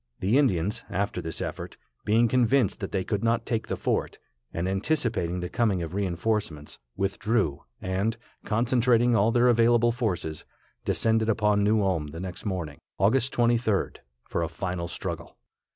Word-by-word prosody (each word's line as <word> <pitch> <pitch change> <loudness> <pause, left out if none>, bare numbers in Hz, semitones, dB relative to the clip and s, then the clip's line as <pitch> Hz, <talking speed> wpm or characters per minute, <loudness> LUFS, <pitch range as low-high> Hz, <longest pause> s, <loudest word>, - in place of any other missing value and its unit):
The 100 +6 +1
Indians, 105 - +1
after 100 -1 -2
this 80 -1 -3
effort, - - -6 0.3
being 115 +3 +4
convinced 125 -1 +2
that 100 - -5
they 95 -2 0
could 100 +3 -2
not 115 0 +1
take 115 -4 -2
the - - -2
fort, - - -1 0.3
and 85 +2 -2
anticipating 95 - 0
the 90 - -3
coming 100 -4 0
of 80 +1 -6
reinforcements, 95 -4 -2 0.2
withdrew, 95 -4 0 0.2
and, 100 +5 -1 0.3
concentrating 120 +1 +3
all 110 +2 +3
their 120 +1 +4
available 120 0 +4
forces, 90 -10 -2 0.4
descended 110 0 +1
upon 105 -2 +2
New 105 0 +3
Ulm 90 -6 0
the 80 +3 -8
next 90 +3 -6
morning, 90 -7 -3 0.2
August 120 +6 +2
23d, 115 -4 +1 0.3
for - - -2
a 85 - 0
final 85 +1 -3
struggle. - - -6
105 Hz, 150 wpm, -27 LUFS, 90-115 Hz, 0.4 s, being